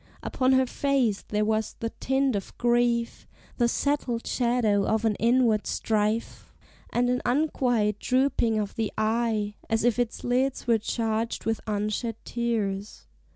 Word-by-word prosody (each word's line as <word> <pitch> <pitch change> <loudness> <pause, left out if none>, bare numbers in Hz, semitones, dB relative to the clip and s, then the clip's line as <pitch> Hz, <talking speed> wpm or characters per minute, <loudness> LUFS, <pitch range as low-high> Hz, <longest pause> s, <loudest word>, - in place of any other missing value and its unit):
Upon 260 0 +1
her 260 0 +4
face 255 -6 0
there 210 0 0
was 220 0 -1
the 230 0 -3
tint 265 -2 0
of 200 - -5
grief, 240 -1 +1 0.3
The 240 - +3
settled 250 -2 -1
shadow 235 -5 +1
of 220 +1 +1
an 220 - +3
inward 235 -2 +3
strife, 215 +1 -1 0.4
And 245 +1 +1
an 250 0 0
unquiet 245 -6 +1
drooping 255 -4 +1
of 205 -2 -2
the 220 -2 -2
eye, 220 -1 0 0.2
As 225 0 +1
if 240 0 +2
its 240 -2 -2
lids 255 +2 0
were 230 -2 +3
charged 225 +1 -2
with 225 0 -1
unshed 215 +2 -2
tears. 215 -4 -2
230 Hz, 145 wpm, -26 LUFS, 215-245 Hz, 0.4 s, her